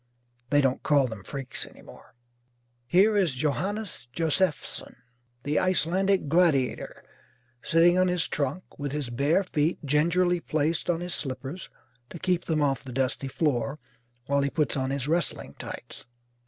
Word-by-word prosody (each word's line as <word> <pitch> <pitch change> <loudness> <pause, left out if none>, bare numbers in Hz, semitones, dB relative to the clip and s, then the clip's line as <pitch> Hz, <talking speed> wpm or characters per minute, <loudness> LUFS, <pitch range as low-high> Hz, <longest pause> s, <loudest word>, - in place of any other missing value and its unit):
(They 145 0 +4
don't 135 -2 +1
call 145 -3 +3
them 110 -5 -6
Freaks 135 +5 -5
any - - -13
more.) - - -15 0.7
Here 200 - +4
is 180 -9 +2
Johannes 170 - -2
Joseffson, 165 +2 -1 0.5
the 145 +3 +1
Icelandic 185 0 +2
Gladiator, 155 -5 +1 0.6
sitting 175 +2 +4
on 185 - +4
his 180 -2 +1
trunk, 145 +5 -2 0.2
with 145 -1 -3
his 145 -5 -3
bare 145 +10 +2
feet 160 -2 0
gingerly 170 +5 +2
placed 155 +2 -1
on 170 -1 +1
his 175 0 -3
slippers 135 +5 -4 0.4
to - - -8
keep 180 0 0
them 155 -2 +1
off 135 -2 0
the 130 - -8
dusty 135 +1 -1
floor 140 -1 0 0.5
while 140 +1 +2
he 140 - +1
puts 150 +2 +1
on 130 -1 -1
his 140 -1 -2
wrestling 165 0 -1
tights. - - -8
150 Hz, 150 wpm, -27 LUFS, 135-175 Hz, 0.7 s, They